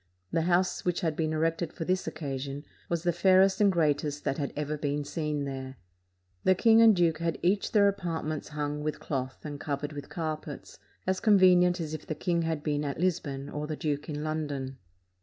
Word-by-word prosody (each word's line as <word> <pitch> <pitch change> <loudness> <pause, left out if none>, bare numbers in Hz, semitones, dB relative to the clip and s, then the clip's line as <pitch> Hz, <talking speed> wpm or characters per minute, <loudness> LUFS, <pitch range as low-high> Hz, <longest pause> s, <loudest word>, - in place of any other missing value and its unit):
The 165 - +1
house 180 +1 +2
which 180 -1 0
had 160 -3 0
been 155 0 0
erected 165 +1 0
for 165 - -5
this 185 0 0
occasion 140 -2 -4 0.2
was 170 -1 -1
the 175 -1 +2
fairest 190 +3 +4
and 200 -1 +6
greatest 150 -3 0
that 135 - -1
had 140 - -2
ever 150 0 -2
been 145 0 -2
seen 150 -2 -2
there. 135 -1 -5 0.7
The 185 - +5
king 225 +4 +5
and 225 -2 +7
duke 165 -3 +2
had 165 -1 -1
each 195 +3 +1
their 205 -2 +5
apartments 165 -6 -2
hung 150 0 -3
with 150 0 -3
cloth 130 -1 -4
and 145 -1 -5
covered 145 +1 -3
with 145 -1 -7
carpets, 155 -3 -5 0.3
as 185 0 0
convenient 180 -4 +5
as 160 -2 -4
if 155 - -6
the 155 - -2
king 170 +2 0
had 160 -2 -2
been 150 -1 0
at 140 0 -3
Lisbon 145 -6 -1
or 150 0 -4
the 155 - -3
duke 150 0 -3
in 150 0 -3
London. 145 -4 -3
155 Hz, 195 wpm, -29 LUFS, 145-175 Hz, 0.7 s, and